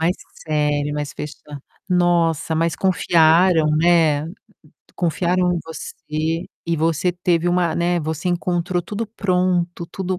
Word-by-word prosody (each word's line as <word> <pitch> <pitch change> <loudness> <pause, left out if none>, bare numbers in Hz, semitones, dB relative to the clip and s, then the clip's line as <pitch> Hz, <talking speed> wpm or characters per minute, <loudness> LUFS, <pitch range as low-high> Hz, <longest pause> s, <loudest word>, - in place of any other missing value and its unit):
Mais 170 +3 +2 0.3
sério, 150 -1 0
mais 150 -1 -4
fecha 150 0 -6 0.5
Nossa, 170 -3 +2
mas 165 0 +1
confiaram, 170 -2 +3
né, 160 -3 +3 0.7
confiaram 180 +1 +1
em - - -1
você 160 +1 -4 0.2
e 170 - 0
você 165 +3 +1
teve 175 -1 0
uma, 175 -1 +1
né, 175 0 +1
você 160 +3 -3
encontrou 175 0 -1
tudo 210 +5 -4
pronto, 180 -4 -1
tudo 185 0 -3
170 Hz, 125 wpm, -21 LUFS, 160-180 Hz, 0.7 s, confiaram